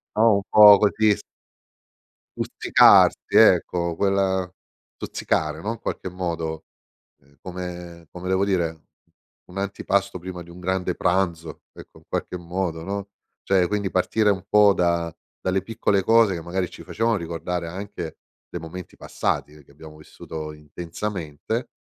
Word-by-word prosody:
No, 110 0 +5
un - - -1
po' 105 -1 +9
così 105 +1 +3
s - - -12 1.2
stuzzicarsi, - - +4
ecco, 85 -1 +4
quella 95 -1 0 0.4
stuzzicare, 80 0 -2
no, 110 +5 -2
in 115 - -11
qualche 95 - -4
modo, 85 -3 -4 0.6
ehm, 70 0 -27
come 90 -2 -8
come 90 +1 -8
devo 95 +1 +2
dire? 85 -5 -1 0.7
Un 90 - -10
antipasto 100 -1 -1
prima 90 0 -7
di 85 - -16
un 85 +1 -12
grande 90 0 -1
pranzo. 85 -3 -1
Ecco, - - -14
in - - -27
qualche 90 - -3
modo, 85 -1 -3
no, 100 +2 -4 0.3
cioè 95 -2 +2
quindi 100 -1 -2
partire 105 +3 +2
un 95 -3 -3
po' 105 -1 +6
da 85 -2 0 0.3
dalle 95 +1 0
piccole 100 -2 0
cose 115 -1 +4
che 85 - -5
magari 90 +2 -3
ci - - -11
facevano 115 0 0
ricordare 85 0 -4
anche 90 -2 -7 0.3
dei 85 - -5
momenti 90 +2 -9
passati, 75 - -2
ehm, 75 -1 -16
che - - -28
abbiamo 75 +1 -13
vissuto 75 0 -8
intensamente. 85 - -5
90 Hz, 145 wpm, -23 LUFS, 85-100 Hz, 1.2 s, po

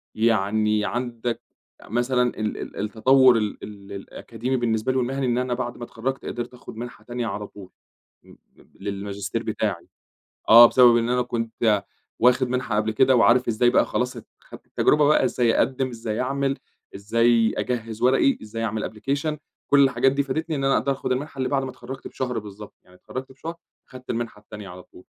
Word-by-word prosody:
يعني 110 -1 +1
عندك 120 -1 -3 0.4
آآ - - -15
مثلًا 125 +3 +1 0.2
ال 110 -1 -2
ال - - -8
التطوّر 125 +4 +4
ال 105 -2 -2
ال 100 -1 -10
الأكاديمي 115 +5 -4
بالنسبة 115 0 0
لي 130 - -1
والمهني 130 +2 -1
إن 120 -1 +1
أنا 125 0 -1
بعد 120 -1 -4
ما 120 - -8
اتخرجت 130 +4 -4
قدرت 120 +1 -5
آخُد 125 - -11
منحة 120 +2 -8
تانية 120 -1 -4
على 105 0 -4
طول، 95 -2 -13 0.5
م - - -17 0.2
ب - - -24
للماجستير 100 +2 -4
بتاعي 100 -5 -3 0.6
آه، 120 +1 +11
بسبب 120 -1 +6
إن 115 0 +1
أنا 125 0 +2
كنت 115 -3 0 0.4
واخد 125 +1 +4
منحة 125 -3 -1
قبل 110 +1 +1
كده 130 +4 +4
وعارف 120 +1 +4
إزاي 120 +2 +3
بقى - - +4
خلاص 125 0 -1
ت - - -10
خدت - - -14
التجربة 150 -1 +3
بقى 150 -2 +4
إزاي 120 -2 +2
أقدّم، 130 0 +1
إزاي 115 -2 -4
أعمل، 135 +1 -1 0.4
إزاي 115 +2 +2
أجهّز 115 -3 -3
ورقي، 135 +2 +3
إزاي 115 +1 -5
أعمل 110 -1 -2
application 140 +7 -2 0.3
كل 140 -1 +6
الحاجات 135 0 +2
دي 140 0 +1
فادتني، 155 +3 -3
إن 135 - -2
أنا 135 0 +3
أقدر 140 - 0
آخُد 135 -1 -2
المنحة 140 +2 -4
اللي 130 - 0
بعد 135 -1 0
ما 130 - -5
اتخرّجت 130 0 -9
بشهر 125 -3 -3
بالضبط، 105 -1 -10
يعني 90 0 -20
اتخرّجت 130 +6 -8
بشهر 160 +5 -7 0.3
خدت 130 -1 -11
المنحة 115 -2 -4
التانية 105 -1 -10
على 90 0 -10
طول، 90 - -18
120 Hz, 185 wpm, -24 LUFS, 110-130 Hz, 0.6 s, آه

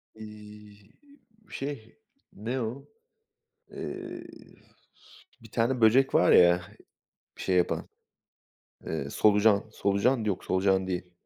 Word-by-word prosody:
Eee, 105 -1 -12 0.8
şey, 135 - -7 0.3
ne 120 +6 -4
o? 120 +5 -5 0.9
Eee, - - -7 1.2
bir - - -15
tane 120 +2 0
böcek 125 +5 +4
var 90 - +5
ya, 90 0 +6 0.8
şey 95 - -1
yapan. 90 -1 0 1.0
Eee, 75 -4 -4
solucan. 105 +3 +3
Solucan? 110 +5 +1
Yok, 100 -4 -2
solucan 95 0 +1
değil. 90 -1 -4
105 Hz, 95 wpm, -28 LUFS, 95-115 Hz, 1.2 s, ya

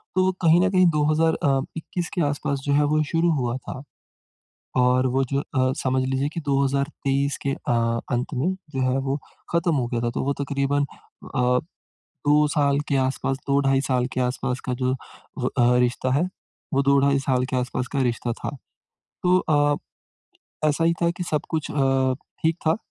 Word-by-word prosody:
तो, 185 0 +3
कहीं 170 0 +5
न 190 - +3
कहीं 185 -1 +5
2,000 155 +2 +3
अ, 135 -2 +3 0.2
21 175 +2 -4
के 180 - 0
आस-पास 140 -1 -2
जो 140 - +1
है 150 - +4
वो 155 - +3
शुरू 165 0 +3
हुआ 125 -3 -1
था। 130 0 -8 1.0
और 125 +1 +3
वो 135 - +3
जो 140 - +2
अ, 130 -2 0
समझ 130 0 +1
लीजिए 135 +1 0
की - - -3
2023 140 0 0
के 140 - +1
अ, 115 -2 0
अंत 125 +3 -1
में 155 +9 0 0.2
जो 130 - 0
है 130 +1 +1
वो 135 +2 0 0.3
खत्म 170 0 +2
हो 125 -4 0
गया 120 -1 -2
था 120 - 0
तो - - -2
वो 140 - 0
तकरीबन 140 0 0 0.5
अ, 125 -1 +3 0.7
2 150 +1 +5
साल 140 -1 +3
के 140 - +1
आस-पास 135 0 0
2 140 0 +3
ढाई 135 -1 +2
साल 130 -3 +1
के - - -2
आस-पास 125 +1 -1
का - - +1
जो 130 +1 +2
अ, 125 -1 -1
रिश्ता 125 +1 +1
है 145 +5 +3 0.5
वो 140 - +3
2 140 0 +4
ढाई 140 0 +3
साल 130 -2 +1
के - - -1
आस-पास 125 0 -2
का 140 - +1
रिश्ता 120 0 -2
था। 140 - -6 0.7
तो 180 0 +4
अ, 145 -4 +2 0.9
ऐसा 160 +3 +1
ही 170 - +4
था 170 - +3
की 175 +1 -5
सब 150 -2 +1
कुछ 160 -2 -2
अ, - - -6 0.7
ठीक 160 +1 +2
था, 160 - +4
140 Hz, 190 wpm, -24 LUFS, 130-150 Hz, 1.0 s, कहीं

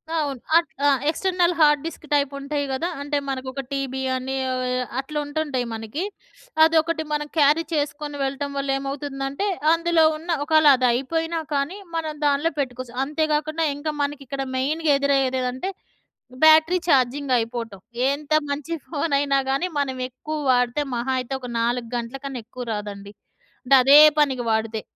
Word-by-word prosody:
అవును 285 -5 -1 0.2
అట్ 335 - +1 0.2
ఆ! - - +6 0.2
External 355 +1 +1
hard disk 305 +1 +2
type 285 -1 +2
ఉంటాయి 285 0 -2
గదా! 320 +6 -1
అంటే 290 0 -1
మనకు 265 -1 -4
ఒక 275 +1 -4
టీబీ 265 -1 -3
అని 260 +1 -4
ఏవోయో 255 0 -1 0.2
అట్లా 300 +3 -5
ఉంటుంటాయి 290 -4 -2
మనకి. 225 - -4 0.6
అదొకటి 320 0 +3
మనం 295 0 -1
క్యారీ 300 +3 +4
చేసుకొని 290 0 -2
వెళ్ళటం 275 +1 -3
వల్ల 275 0 -2
ఏమవుతుందంటే 275 +4 -4 0.3
అందులో 335 -1 +3
ఉన్న 335 +3 -13 0.2
ఒకాళ 310 -1 +4
అది 250 -1 +2
అయిపోయినా 325 +7 -1
కానీ, 285 +8 -1 0.2
మనం 315 -2 -2
దాంట్లో 290 +3 +2
పెట్టుకోవచ్చు. 250 -2 -4
అంతేకాకుండా 310 +1 0
ఇంకా 295 +2 -3
మనకి 285 0 -2
ఇక్కడ 275 0 -4 0.2
మెయిన్‍గ 310 +5 -1
ఎదురయ్యేది 270 -2 +1
ఏంటంటే 255 +8 -3 0.7
బ్యాటరీ 315 +3 +6
ఛార్జింగ్ 270 0 +2
అయిపోవటం. 230 -3 -4 0.3
ఎంత 290 +1 -6 0.2
మంచి 290 +3 -3
ఫోన్ 310 0 -2
అయినా 280 -1 +1
కానీ 275 +7 +1
మనం 265 -2 -1
ఎక్కువ 305 +5 -6
వాడితే 245 +3 +2
మహా 245 +3 -2
అయితే 255 +1 -5
ఒక 250 - -7
4 235 0 0
గంటల 235 +3 -5
కన్నా 270 -3 -5
ఎక్కువ 250 +1 -8
రాదండి. 205 -1 -6 0.5
అంటె 270 +2 +5
అదే 280 +3 +8 0.2
పనికి 265 -5 +2
వాడితే, 220 0 -1
280 Hz, 150 wpm, -23 LUFS, 255-310 Hz, 0.7 s, అదే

